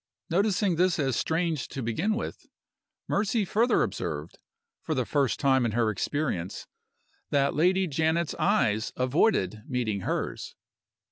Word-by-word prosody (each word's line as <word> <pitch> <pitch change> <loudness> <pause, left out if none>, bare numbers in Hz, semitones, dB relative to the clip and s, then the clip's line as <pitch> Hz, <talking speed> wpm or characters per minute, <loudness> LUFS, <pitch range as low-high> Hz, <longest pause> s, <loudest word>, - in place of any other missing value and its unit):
Noticing 195 -1 +2
this 180 0 +3
as 135 -5 0
strange 160 -1 -1
to 135 - -6
begin 165 - 0
with, 235 - -6 0.6
Mercy 210 +1 +1
further 230 +6 +2
observed, - - -4 0.4
for 160 - -2
the 130 -2 0
first 140 -1 0
time 130 -2 +3
in 115 -3 0
her 115 -2 +2
experience, 105 - -2 0.6
that 140 -1 +2
Lady 185 +5 +3
Janet's 160 +1 0
eyes 110 - +2
avoided 125 - +1
meeting 120 -6 -1
hers. - - -3
150 Hz, 130 wpm, -27 LUFS, 125-185 Hz, 0.6 s, this